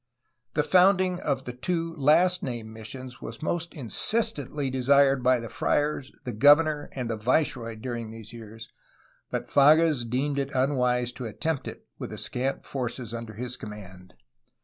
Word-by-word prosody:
The 150 - +3
founding 185 +1 +4
of 135 -5 -2
the 125 - -5
two 165 +5 -2
last 170 +5 +4
named 120 -4 -4
missions 125 +4 -9
was - - -8
most 170 +1 -1
insistently 145 - -1
desired 135 +1 +4
by 125 0 +3
the 115 - -6
friars, 145 +2 -1
the 125 - -4
governor, 145 +5 +5
and 125 -3 -3
the 115 -1 -2
viceroy 120 0 0
during 115 0 -5
these 110 0 -10
years, 115 -1 -10 0.6
but - - -3
Fages 150 -3 +4
deemed 140 +3 0
it 140 0 -3
unwise 125 -2 +1
to 125 -1 -6
attempt 155 +6 -3
it - - -8
with - - -5
the - - -7
scant 130 +2 -3
forces 120 -3 -4
under 115 -2 -6
his 125 +2 -5
command. 95 -4 -10
130 Hz, 155 wpm, -27 LUFS, 115-150 Hz, 0.6 s, governor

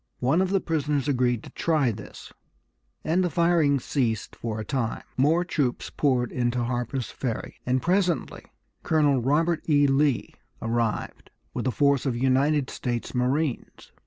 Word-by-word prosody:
One 140 +8 +2
of 190 - +1
the 195 0 +2
prisoners 150 -5 -1
agreed 125 -4 +1
to - - -11
try 150 -7 +1
this, 105 -1 -10 0.7
and 175 +4 +1
the 180 - +1
firing 170 -4 +3
ceased 120 -5 -2
for 110 -2 -4
a 110 - -5
time. 125 -4 -2
More 160 +7 +3
troops 145 -7 -1
poured 125 -4 +1
into 120 0 0
Harper's 120 0 -3
Ferry, 120 -5 -5
and 125 0 +1
presently 180 -5 0 0.4
Colonel 145 -5 +2
Robert 160 +6 +1
E. 145 -1 +5
Lee 140 -2 +1 0.3
arrived 115 -1 -2 0.2
with - - -2
a - - +2
force 140 0 +2
of 125 - 0
United 135 +2 +2
States 120 -2 -3
marines. 130 +2 -2
135 Hz, 150 wpm, -26 LUFS, 125-155 Hz, 0.7 s, E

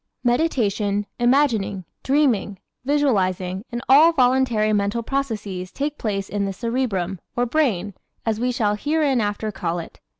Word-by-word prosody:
Meditation, 220 -7 +1
imagining, 240 -7 +2 0.2
dreaming, 255 -8 +1 0.3
visualizing 195 -10 0
and 240 0 -4
all 300 +6 +7
voluntary 250 -6 +2
mental 205 +3 0
processes 210 -9 -3
take 290 +1 -3
place 200 -3 -2
in 205 -1 -2
the 195 - -3
cerebrum, 200 -5 -2 0.2
or 245 - +1
brain, 230 - 0 0.3
as 220 -1 0
we 250 +1 0
shall 215 -4 +1
hereinafter 240 -6 0
call 175 -3 -3
it. 170 - -8
225 Hz, 130 wpm, -22 LUFS, 200-265 Hz, 0.3 s, all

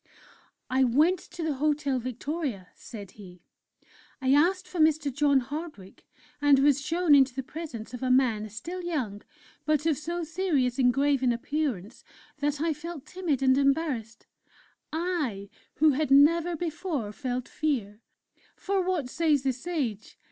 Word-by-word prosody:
"I 260 +1 +2
went 305 +9 +3
to 350 -1 -8
the 315 -2 0
Hotel 285 -1 0
Victoria," 255 - -4
said 205 -5 -10
he; 180 -4 -14 0.8
"I 265 0 +2
asked 360 +5 +3
for 360 - -6
Mr. 310 -3 +3
John 285 -1 +3
Hardwick, 280 - -8 0.3
and 290 -1 +6
was 280 0 +3
shown 330 +1 +2
into 270 -3 +5
the 265 - -3
presence 265 -7 -8
of 245 - -6
a 260 - -1
man, 235 -5 +2
still 335 - -6
young, 260 - -3 0.4
but 305 -1 +1
of 315 -4 +1
so 340 +3 -3
serious 310 -7 0
and 250 -1 +5
grave 275 +1 +1
an 255 -2 +3
appearance 240 - -3 0.4
that 290 0 -1
I 325 +1 +1
felt 310 -1 -8
timid 355 -8 -2
and 260 -1 +5
embarrassed 275 -6 -1 0.7
I 300 - -2 0.2
who 310 +1 +5
had 290 +1 -1
never 330 +5 +5
before 320 - -3
felt 250 +1 -4
fear! 235 -9 -2 0.5
(For, 395 -1 -1
what 360 -7 -1
says 300 0 +1
the 265 -1 +1
Sage? 250 - -4
285 Hz, 150 wpm, -27 LUFS, 250-320 Hz, 0.8 s, and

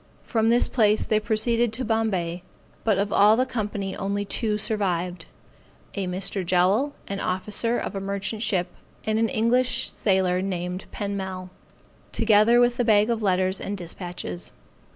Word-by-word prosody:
From 225 -2 +1
this 240 +1 +4
place 215 -3 +3
they 215 - +1
proceeded 230 +2 +1
to 255 +3 -3
Bombay, 195 -6 -1 0.4
but 215 -4 +2
of 200 +1 -1
all 210 +2 +6
the 255 - +2
company 205 -5 -3
only 200 +1 -2
two 210 +1 0
survived. 180 -5 -1 0.7
A 195 -2 -3
Mr. 185 +1 -2
Jowl, 190 +11 +2
an 200 0 -4
officer 210 +6 -1
of - - -4
a - - -2
merchant 200 +2 -3
ship, 180 -5 0 0.4
and 220 0 +1
an 225 0 +2
English 250 +1 +1
sailor 190 -2 +1
named 180 -1 -3
Penmel 190 -3 -4 0.6
together 225 +1 +4
with 240 0 +3
the 245 - +2
bag 215 0 +4
of 225 -1 -1
letters 185 -1 +1
and 200 0 -4
dispatches. 175 - -7
205 Hz, 150 wpm, -25 LUFS, 185-225 Hz, 0.7 s, all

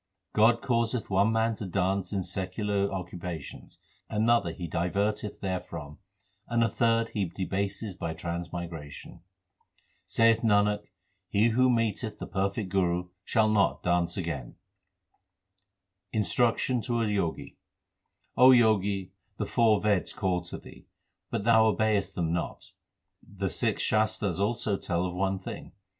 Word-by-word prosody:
God 115 +2 +4
causeth 115 -3 0
one 100 +3 +3
man 115 0 +2
to 105 - -5
dance 95 0 0
in 100 -2 -1
secular 100 +2 -1
occupations, 90 -4 -7 0.3
another 110 -4 +2
He 85 +1 -6
diverteth 100 +6 -1
therefrom, 90 -6 -5 0.5
and 115 -1 +2
a 115 - +2
third 115 +1 +1
He 100 -2 -1
debaseth 95 +2 -3
by 80 -1 -3
transmigration. 85 -3 -6 0.9
Saith 115 0 +4
Nanak, 105 -2 +3 0.5
he 105 +3 +3
who 130 +3 +3
meeteth 115 -2 0
the - - -6
perfect 100 +1 -2
Guru 90 -2 0
shall 110 0 +2
not 105 -2 +2
dance 85 +1 +1
again. 80 -9 -4 1.6
Instruction 115 +4 +1
to 120 0 -1
a - - +1
Jogi: 100 -6 -2 0.8
O 130 +1 +8
Jogi, 100 -5 +2 0.3
the - - -2
four 110 -3 +3
Veds 105 -3 0
call 90 -2 0
to - - -6
thee, - - -14 0.4
but - - -2
thou 110 0 +5
obeyest 110 -2 +1
them 85 -2 -1
not; 85 - -4 0.5
The 95 -2 -4
six - - 0
Shastars 110 -4 +1
also 105 -1 0
tell 85 0 -1
of 90 - -3
one 95 +1 0
thing. 95 - -8
100 Hz, 130 wpm, -28 LUFS, 90-110 Hz, 1.6 s, O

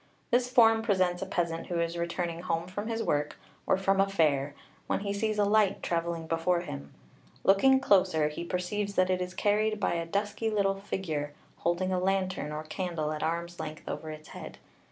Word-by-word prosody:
This 245 +1 +3
form 225 -3 +5
presents 185 -5 +1
a 195 - -3
peasant 170 -3 -2
who 175 -1 -1
is 170 0 -1
returning 170 0 -2
home 170 -2 -1
from 205 +4 -5
his 225 0 -1
work, 150 -6 0 0.3
or - - +4
from 195 0 +2
a 195 - +2
fair, 145 -6 +1 0.3
when - - 0
he 200 -1 -2
sees 215 +1 -1
a 205 - +3
light 205 -1 +3
travelling 170 -1 -1
before 165 +2 +1
him. 70 - -7 0.5
Looking 265 +8 +5
closer 185 - +3
he 150 +3 -5
perceives 200 +4 -2
that 185 0 +3
it 185 0 0
is 180 +1 -4
carried 215 +1 +1
by - - +1
a 170 -1 -2
dusky 205 +4 -1
little 200 -2 +2
figure, 165 -7 -4 0.2
holding 185 +2 0
a 180 - +1
lantern 185 -4 0
or 155 +1 -4
candle 155 -1 -3
at 155 -1 -4
arm's 170 +1 -2
length 155 0 -6
over 155 - -4
its 155 0 -9
head. - - -9
180 Hz, 195 wpm, -29 LUFS, 165-200 Hz, 0.5 s, form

